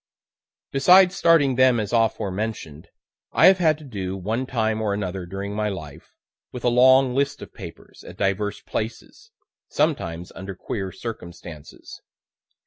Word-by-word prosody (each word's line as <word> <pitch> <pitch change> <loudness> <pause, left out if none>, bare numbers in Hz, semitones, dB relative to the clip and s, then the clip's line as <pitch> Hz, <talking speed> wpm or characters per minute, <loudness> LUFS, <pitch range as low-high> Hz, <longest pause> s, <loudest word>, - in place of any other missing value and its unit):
Besides 180 +6 +5
starting 165 -7 +4
them 130 -2 +4
as 105 +1 -4
aforementioned, 105 -7 -2 0.5
I - - +5
have 190 0 +6
had 160 -3 +3
to 155 - -14
do, 95 -8 -5
one 110 +7 -3
time 110 -3 -1
or 105 -2 0
another, 95 -3 -4
during 100 +2 -5
my 105 0 -1
life, 80 -8 -9 0.4
with 125 - -8
a 120 - +3
long 130 +1 +5
list 140 +2 -1
of - - -13
papers, - - -12
at 90 - -12
divers 100 +1 -1
places, 115 - -6 0.4
sometimes 90 - -2
under 95 0 -8
queer 95 +1 -5
circumstances. 85 -9 -10
110 Hz, 140 wpm, -23 LUFS, 95-130 Hz, 0.5 s, have